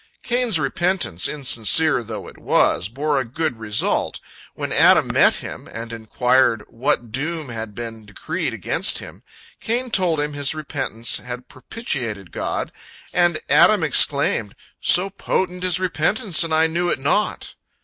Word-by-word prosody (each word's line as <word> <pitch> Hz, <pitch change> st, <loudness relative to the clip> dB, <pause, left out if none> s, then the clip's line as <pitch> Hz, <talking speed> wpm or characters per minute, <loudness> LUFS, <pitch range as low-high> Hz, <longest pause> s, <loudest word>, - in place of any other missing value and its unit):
Cain's 240 Hz, -7 st, +1 dB
repentance, 165 Hz, -, 0 dB
insincere 140 Hz, +1 st, +3 dB
though 110 Hz, -1 st, -7 dB
it -, -, -14 dB
was, 90 Hz, -, +1 dB
bore 145 Hz, +4 st, -1 dB
a -, -, -1 dB
good 130 Hz, +1 st, -4 dB
result. 105 Hz, -1 st, -1 dB, 0.4 s
When -, -, -5 dB
Adam -, -, +5 dB
met -, -, +4 dB
him, -, -, -7 dB
and 115 Hz, 0 st, -7 dB
inquired 115 Hz, 0 st, +1 dB
what 120 Hz, -1 st, -2 dB
doom 150 Hz, +3 st, -4 dB
had 110 Hz, -3 st, -7 dB
been 115 Hz, -2 st, -8 dB
decreed 100 Hz, -, -4 dB
against -, -, +2 dB
him, -, -, -8 dB, 0.4 s
Cain 245 Hz, +2 st, -3 dB
told 175 Hz, -6 st, +2 dB
how 150 Hz, 0 st, -1 dB
his 145 Hz, 0 st, -2 dB
repentance 135 Hz, -6 st, -2 dB
had 125 Hz, 0 st, -8 dB
propitiated 125 Hz, -, -5 dB
God, -, -, -4 dB, 0.4 s
and 175 Hz, -3 st, +2 dB
Adam 210 Hz, -5 st, +4 dB
exclaimed, 140 Hz, -8 st, +3 dB, 0.3 s
"So 190 Hz, +2 st, +4 dB
potent 180 Hz, -2 st, -3 dB
is 180 Hz, -1 st, +3 dB
repentance, 180 Hz, +1 st, +1 dB
and 165 Hz, -, -4 dB
I 160 Hz, +1 st, +3 dB
knew 170 Hz, +2 st, -1 dB
it -, -, +1 dB
not!" 150 Hz, +10 st, -1 dB
145 Hz, 145 wpm, -20 LUFS, 115-175 Hz, 0.4 s, Adam